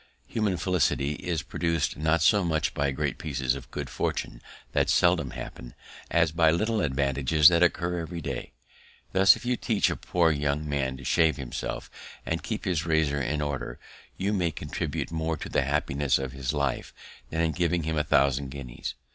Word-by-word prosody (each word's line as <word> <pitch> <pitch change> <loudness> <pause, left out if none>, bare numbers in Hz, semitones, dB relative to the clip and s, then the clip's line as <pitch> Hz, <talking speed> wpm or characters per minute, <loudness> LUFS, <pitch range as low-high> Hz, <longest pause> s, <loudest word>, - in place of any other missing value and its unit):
Human 105 -5 -1
felicity 80 -6 +1
is 85 0 -3
produced 85 -2 -1
not 80 +1 +1
so 100 +3 +5
much 80 -3 0
by 70 -1 0
great 65 - -2
pieces 70 -4 -1
of 70 -2 -8
good 75 -2 -5
fortune - - -3 0.3
that - - +1
seldom - - +3
happen, - - -8 0.3
as 85 -2 +3
by 80 0 +4
little 105 +7 +1
advantages 70 +1 +4
that 85 -1 +2
occur 90 0 +2
every 85 +1 -5
day. 70 -6 -5 0.6
Thus, 95 0 +7
if - - -10
you 125 0 +1
teach 110 -4 +1
a - - -1
poor 85 -2 +2
young 75 0 -1
man 65 -2 -1
to 70 - -11
shave 80 +4 +3
himself, 65 -4 -5 0.3
and 80 0 -2
keep 110 -1 -4
his 90 -4 0
razor 80 -3 +1
in 75 +3 -1
order, 70 -4 -3 0.4
you 100 +2 0
may 90 -4 +1
contribute 75 0 -4
more 80 0 -1
to - - -7
the - - +2
happiness 70 0 +1
of 65 -1 -4
his 65 -1 -3
life 70 -3 -2 0.3
than 80 - -1
in 80 -1 +2
giving 85 0 0
him 80 +1 -1
a - - +1
thousand 70 -1 +2
guineas. 65 -3 -6
80 Hz, 180 wpm, -27 LUFS, 70-85 Hz, 0.6 s, Thus